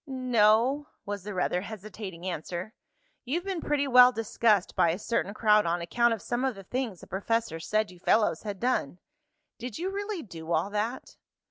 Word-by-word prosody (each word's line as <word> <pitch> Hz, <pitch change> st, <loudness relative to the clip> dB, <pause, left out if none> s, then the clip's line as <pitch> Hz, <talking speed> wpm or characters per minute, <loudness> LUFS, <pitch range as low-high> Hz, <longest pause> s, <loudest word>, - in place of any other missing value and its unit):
"No," 255 Hz, +2 st, +3 dB, 0.2 s
was 205 Hz, 0 st, -4 dB
the 205 Hz, +2 st, -6 dB
rather 180 Hz, 0 st, 0 dB
hesitating 200 Hz, -3 st, -8 dB
answer. 175 Hz, +3 st, -4 dB, 0.5 s
"You've 310 Hz, +8 st, -2 dB
been 380 Hz, -4 st, -3 dB
pretty 285 Hz, -1 st, 0 dB
well 250 Hz, -1 st, +8 dB
discussed 220 Hz, -3 st, +1 dB
by 170 Hz, -, +4 dB
a 165 Hz, -, 0 dB
certain 205 Hz, -1 st, -1 dB
crowd 210 Hz, -4 st, +4 dB
on 170 Hz, +1 st, 0 dB
account 235 Hz, +8 st, +2 dB
of 215 Hz, -, -13 dB
some 245 Hz, +1 st, -2 dB
of 265 Hz, -3 st, 0 dB
the 195 Hz, -, -10 dB
things 230 Hz, -3 st, -3 dB
the -, -, -10 dB
professor 205 Hz, -2 st, -1 dB
said 215 Hz, +4 st, 0 dB
you 180 Hz, -, -15 dB
fellows 215 Hz, +4 st, +2 dB
had 205 Hz, -3 st, -5 dB
done. 235 Hz, -, 0 dB, 0.6 s
Did 245 Hz, -1 st, -6 dB
you 365 Hz, +4 st, -2 dB
really 405 Hz, -2 st, -4 dB
do 165 Hz, -5 st, -9 dB
all 170 Hz, +6 st, 0 dB
that?" 220 Hz, +5 st, -3 dB
215 Hz, 180 wpm, -28 LUFS, 185-250 Hz, 0.6 s, well